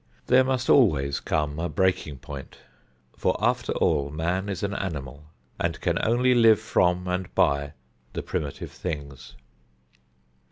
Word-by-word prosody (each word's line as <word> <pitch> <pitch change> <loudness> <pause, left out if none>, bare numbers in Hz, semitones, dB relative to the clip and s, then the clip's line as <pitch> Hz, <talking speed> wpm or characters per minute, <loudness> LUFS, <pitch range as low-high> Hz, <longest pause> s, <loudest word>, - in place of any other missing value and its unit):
There 130 +1 +5
must 130 -1 -1
always 75 - +4
come 75 -1 -1
a 85 +1 -2
breaking 95 -7 0
point, 70 +1 -9 0.6
for, - - 0
after - - 0
all, 70 0 +1
man 85 +6 -2
is 95 -2 -4
an 100 0 -1
animal 75 -7 -5 0.3
and - - -1
can - - 0
live - - -1
only 120 -1 +5
from 90 -4 +1
and 90 0 -3
by 70 +1 +2 0.4
the - - -4
primitive 70 -2 -4
things. 70 -6 -7
85 Hz, 135 wpm, -25 LUFS, 70-100 Hz, 0.6 s, There